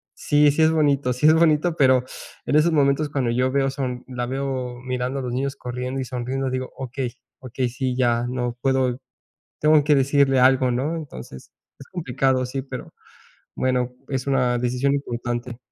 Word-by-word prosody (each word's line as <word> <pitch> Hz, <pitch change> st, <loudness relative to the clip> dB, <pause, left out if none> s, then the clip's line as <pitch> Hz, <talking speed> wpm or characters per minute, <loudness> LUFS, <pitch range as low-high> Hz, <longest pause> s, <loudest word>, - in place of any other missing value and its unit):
sí, 145 Hz, 0 st, +3 dB
sí 150 Hz, -, 0 dB
es 155 Hz, -, +5 dB
bonito, 145 Hz, -5 st, +2 dB
sí 125 Hz, +4 st, -1 dB
es 155 Hz, -, +7 dB
bonito, 160 Hz, +1 st, +3 dB
pero 130 Hz, -2 st, +4 dB, 0.4 s
en -, -, 0 dB
esos 155 Hz, +3 st, +4 dB
momentos 145 Hz, 0 st, +2 dB
cuando 135 Hz, -5 st, -1 dB
yo 125 Hz, +2 st, +1 dB
veo 135 Hz, 0 st, +1 dB
son 130 Hz, -3 st, -4 dB
la 125 Hz, -1 st, -4 dB
veo 130 Hz, -2 st, -3 dB
mirando 130 Hz, +1 st, -2 dB
a -, -, -4 dB
los 125 Hz, -1 st, -4 dB
niños 135 Hz, +2 st, -2 dB
corriendo 125 Hz, +1 st, -5 dB
y -, -, -4 dB
sonriendo, 130 Hz, +2 st, -3 dB
digo: 130 Hz, 0 st, -3 dB
2Okey 130 Hz, -1 st, -4 dB, 0.3 s
okey. 130 Hz, 0 st, -2 dB
Sí, 130 Hz, +1 st, -2 dB
ya. 120 Hz, -2 st, +2 dB
No 125 Hz, -1 st, -3 dB
puedo, 130 Hz, -1 st, +1 dB, 0.6 s
tengo 150 Hz, -1 st, +5 dB
que 150 Hz, 0 st, +4 dB
decirle 135 Hz, -1 st, +3 dB
algo, 130 Hz, 0 st, +4 dB
¿no?" 140 Hz, +7 st, -1 dB
Entonces, 65 Hz, -, -9 dB, 0.3 s
es -, -, -13 dB
complicado, 130 Hz, -5 st, 0 dB
sí, 135 Hz, +1 st, -4 dB
pero, 130 Hz, -2 st, -8 dB, 0.6 s
bueno, 125 Hz, -1 st, 0 dB
es 130 Hz, -1 st, -3 dB
una 125 Hz, -3 st, +2 dB
decisión 125 Hz, +3 st, 0 dB
importante. 120 Hz, -3 st, -4 dB
130 Hz, 175 wpm, -23 LUFS, 125-140 Hz, 0.6 s, es